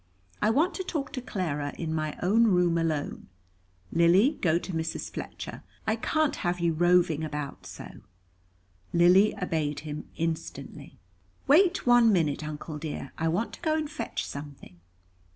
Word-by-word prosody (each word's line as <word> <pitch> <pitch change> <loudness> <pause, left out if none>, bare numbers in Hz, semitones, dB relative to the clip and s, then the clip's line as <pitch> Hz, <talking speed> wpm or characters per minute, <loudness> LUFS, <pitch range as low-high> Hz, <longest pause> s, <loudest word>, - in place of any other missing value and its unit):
I 210 - +3
want 300 +11 +2
to 375 - -4
talk 305 -6 -3
to 255 - -3
Clara, 150 - -3
in 160 -2 -3
my 155 -1 -2
own 220 +6 +4
room 180 -5 +3
alone. 155 -3 -2 0.6
Lily, 185 - +4
go 165 -2 +3
to 175 +1 -5
Mrs. 160 0 -3
Fletcher, - - -7 0.2
I 220 - +1
can't 310 +6 0
have 175 0 -1
you 170 -1 +1
roving 175 -2 +3
about 150 -2 -5
so." - - -10 0.9
Lily 180 +4 +5
obeyed 155 -5 -1
him 150 -1 -7
instantly. 165 -1 -5 0.5
"Wait 350 +6 +4
one 240 -2 +6
minute, 160 -6 +1
Uncle 150 0 -6
dear; 150 -3 -6
I 165 - +1
want 180 +8 -1
to - - -11
go 315 -2 +1
and 310 -1 -1
fetch 230 -5 -4
something." 140 -11 -9
170 Hz, 150 wpm, -28 LUFS, 155-225 Hz, 0.9 s, one